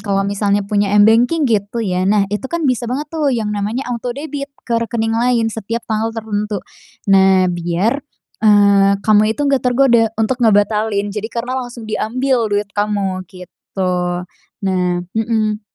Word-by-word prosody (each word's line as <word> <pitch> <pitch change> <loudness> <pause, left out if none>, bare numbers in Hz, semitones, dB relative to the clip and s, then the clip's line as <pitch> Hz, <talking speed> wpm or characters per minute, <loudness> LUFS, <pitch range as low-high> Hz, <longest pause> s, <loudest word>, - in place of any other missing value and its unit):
kalau 195 -1 -1
misalnya 200 0 0
punya 205 0 +1
m-banking 235 +9 +4
gitu 225 -1 0
ya. 185 -1 0
Nah 205 -1 +3
itu 210 +6 -3
kan 340 +1 -2
bisa 250 -3 0
banget 290 +5 -4
tuh, 310 -3 0
yang 225 -5 -1
namanya 210 +6 -2
autodebit 275 +4 -5 0.2
ke 230 -1 0
rekening 225 -1 -1
lain 230 -1 +1
setiap 225 +2 -4
tanggal 220 0 -1
tertentu. 210 -1 -3 0.6
Nah, 190 -1 +5
biar, 175 +9 -1 0.4
eee, 200 -2 +5
kamu 215 +1 +3
itu - - -6
nggak 275 -2 +2
tergoda 245 -2 +3
untuk 225 +3 0
ngebatalin. 210 -2 +2
Jadi 215 +1 -4
karena 240 +2 -4
langsung 245 -2 -8
diambil 235 +2 0
duit 205 0 -1
kamu, 205 -2 -1
gitu. 185 +1 -8 0.8
Nah 180 -2 0
hmm. 220 -1 0
220 Hz, 150 wpm, -17 LUFS, 200-240 Hz, 0.8 s, Nah